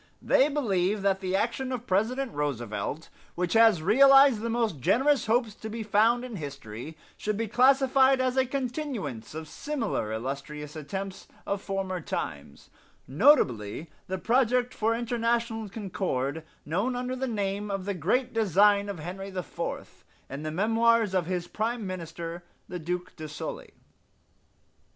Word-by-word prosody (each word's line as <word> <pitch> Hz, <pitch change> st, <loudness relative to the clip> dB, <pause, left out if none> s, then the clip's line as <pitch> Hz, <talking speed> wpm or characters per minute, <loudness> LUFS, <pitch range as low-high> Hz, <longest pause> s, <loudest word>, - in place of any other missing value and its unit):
"They 275 Hz, -, +3 dB
believe 205 Hz, -8 st, 0 dB
that 195 Hz, -1 st, +2 dB
the 190 Hz, -1 st, -2 dB
action 245 Hz, +5 st, -1 dB
of 245 Hz, -2 st, -4 dB
President 235 Hz, +6 st, 0 dB
Roosevelt, 145 Hz, +1 st, -3 dB, 0.3 s
which 180 Hz, 0 st, -1 dB
has 225 Hz, -7 st, +5 dB
realized 270 Hz, -, +6 dB
the 230 Hz, -, -2 dB
most 225 Hz, -, 0 dB
generous 265 Hz, -, +2 dB
hopes 230 Hz, -1 st, +2 dB
to 220 Hz, +1 st, -8 dB
be 225 Hz, +1 st, -4 dB
found 225 Hz, +4 st, +3 dB
in 235 Hz, -5 st, -6 dB
history, 140 Hz, -1 st, -7 dB, 0.2 s
should 210 Hz, -1 st, -2 dB
be 230 Hz, 0 st, -1 dB
classed 260 Hz, +5 st, +4 dB
as 260 Hz, -1 st, +4 dB
a 260 Hz, -1 st, +2 dB
continuance 250 Hz, -, -4 dB
of 160 Hz, 0 st, -6 dB
similar 225 Hz, -, -3 dB
illustrious 140 Hz, +6 st, -5 dB
attempts 190 Hz, +6 st, -6 dB, 0.2 s
of 200 Hz, -1 st, -2 dB
former 190 Hz, -2 st, -3 dB
times, 70 Hz, -, -6 dB, 0.4 s
notably 135 Hz, -, +3 dB, 0.2 s
the 190 Hz, -, -2 dB
project 250 Hz, +3 st, +2 dB
for 225 Hz, +1 st, +1 dB
international 230 Hz, -2 st, -1 dB
concord 175 Hz, -, -3 dB, 0.2 s
known 200 Hz, -, -1 dB
under 250 Hz, +1 st, -3 dB
the 265 Hz, +1 st, -2 dB
name 205 Hz, -2 st, -2 dB
of 195 Hz, -2 st, -3 dB
the 200 Hz, -, -1 dB
'Great 205 Hz, -, 0 dB
Design 205 Hz, -1 st, +4 dB
of 200 Hz, -, -4 dB
Henry 180 Hz, +5 st, -6 dB
IV' 185 Hz, -5 st, -6 dB, 0.3 s
in 140 Hz, +2 st, -5 dB
the 155 Hz, -, -3 dB
memoirs 225 Hz, +4 st, +2 dB
of 180 Hz, -3 st, +1 dB
his 180 Hz, -1 st, -2 dB
Prime 225 Hz, +3 st, -2 dB
Minister, 170 Hz, -1 st, -6 dB, 0.2 s
the 180 Hz, -, -5 dB
Duke 180 Hz, +2 st, -4 dB
de 155 Hz, -2 st, -7 dB
Sully. 145 Hz, -, -7 dB
200 Hz, 145 wpm, -28 LUFS, 170-235 Hz, 0.4 s, realized